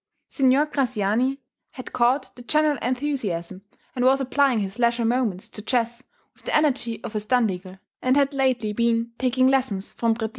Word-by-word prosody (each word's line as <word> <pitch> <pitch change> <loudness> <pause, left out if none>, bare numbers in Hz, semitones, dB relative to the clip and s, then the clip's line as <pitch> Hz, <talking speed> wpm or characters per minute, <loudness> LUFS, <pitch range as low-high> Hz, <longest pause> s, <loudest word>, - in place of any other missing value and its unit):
Signor 270 +1 +3
Graziani 255 -1 0 0.3
had 255 - -9
caught 245 +4 +1
the 245 - -11
general 300 +2 +1
enthusiasm, 230 -9 -3 0.3
and 245 - -1
was 265 +2 +4
applying 270 -2 +2
his 195 +3 -5
leisure 235 -1 +2
moments 225 -6 0
to 210 - -8
chess 235 +1 -1 0.3
with - - -25
the - - -1
energy 270 -6 +1
of - - -6
a - - +1
Standigl, 205 -5 -1 0.2
and 255 +2 +2
had 280 0 +2
lately 255 -6 0
been 235 +1 0
taking 255 0 +2
lessons 255 -8 0
from 230 -1 +1
Préti. 225 -1 -3
245 Hz, 170 wpm, -24 LUFS, 225-265 Hz, 0.3 s, was